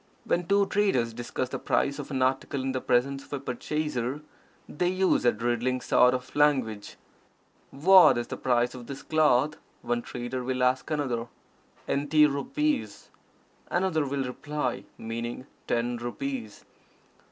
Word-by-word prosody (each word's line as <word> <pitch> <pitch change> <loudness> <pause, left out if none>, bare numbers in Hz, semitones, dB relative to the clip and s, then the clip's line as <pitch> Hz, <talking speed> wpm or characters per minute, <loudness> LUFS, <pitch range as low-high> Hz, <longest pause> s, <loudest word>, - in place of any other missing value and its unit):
When 175 0 0
two 200 0 +4
traders 190 - +1
discuss 120 +2 -4
the - - -4
price 140 +1 0
of 145 - -6
an 130 -3 0
article 130 +1 0
in 135 - -1
the 130 -1 -2
presence 135 +3 +1
of - - -20
a 140 - -2
purchaser, 135 0 -3 0.5
they 175 +4 -1
use 185 -6 +2
a 120 - +6
riddling 120 +3 -1
sort 125 0 +4
of 125 0 -7
language. 130 -8 +1 0.7
"What 170 -1 +6
is 120 - -1
the - - -6
price 120 -1 +1
of 125 -2 -10
this 140 - -7
cloth?" 155 -2 +2 0.3
one 120 0 -1
trader 125 +1 -5
will 130 0 -1
ask 130 +3 +1
another. 130 -6 -1 0.6
"Enty 145 +2 +3
rupees," 275 - -1 0.6
another 175 -5 +1
will 135 0 -1
reply, 130 0 -3
meaning 115 +3 -5 0.2
"ten 120 +1 0
rupees." 120 -2 -5
130 Hz, 145 wpm, -27 LUFS, 120-150 Hz, 0.7 s, a